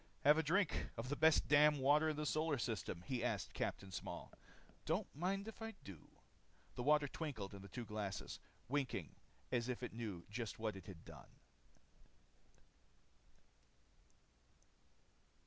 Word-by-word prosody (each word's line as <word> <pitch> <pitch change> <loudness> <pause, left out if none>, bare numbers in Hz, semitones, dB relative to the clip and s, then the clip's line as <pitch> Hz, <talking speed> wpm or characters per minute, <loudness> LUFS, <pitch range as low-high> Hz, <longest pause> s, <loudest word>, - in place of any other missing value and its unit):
"Have 150 +3 +7
a - - +5
drink 170 +3 +2
of 115 +3 -3
the 145 - +1
best 160 +1 +5
damn 150 0 +7
water 145 +4 +5
in 155 - 0
the 150 +1 -2
solar 155 0 +1
system?" 110 -7 -2
He 125 +4 -2
asked - - -1
Capt. 95 -1 -3
Small. - - -5 0.5
"Don't - - +1
mind 195 +6 -1
if 225 - -8
I 225 0 -4
do." 95 -6 -10 0.6
The - - -4
water 150 +2 +4
twinkled 130 -11 -4
in 100 - -8
the 100 - -9
two 120 +5 -5
glasses, 105 -1 -4 0.3
winking 140 +1 -1 0.4
as 120 0 +1
if 125 0 -2
it 125 - -4
knew 105 -7 -4
just 115 +1 -4
what 110 -2 -1
it 95 -2 -10
had 90 -5 -10
done. - - -11
130 Hz, 145 wpm, -40 LUFS, 105-150 Hz, 0.6 s, Have